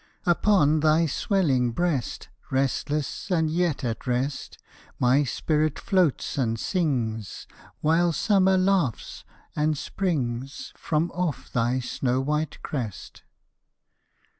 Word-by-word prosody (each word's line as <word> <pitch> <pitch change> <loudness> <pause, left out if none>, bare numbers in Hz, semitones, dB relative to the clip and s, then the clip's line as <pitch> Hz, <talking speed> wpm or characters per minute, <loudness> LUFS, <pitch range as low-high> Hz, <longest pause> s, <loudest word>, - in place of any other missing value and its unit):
Upon 175 -4 +3
thy 155 +2 +3
swelling 140 - +1
breast 165 -4 -1 0.2
Restless 140 +5 -1
and 160 -4 +1
yet 165 -4 0
at 115 -1 -3
rest, 130 +3 -2 0.4
My 130 +4 +3
spirit 155 +2 0
floats 175 -7 +1
and 115 -3 0
sings, 120 - -2 0.4
While 165 +3 +3
Summer 190 +3 +3
laughs 185 - 0 0.3
and 150 0 +1
springs 135 -8 -3
From 160 +2 -1
off 175 -5 -3
thy 120 +2 +1
snow 125 +1 -1
white 150 +3 -2
crest. 120 -9 -5
150 Hz, 105 wpm, -25 LUFS, 125-170 Hz, 0.4 s, Upon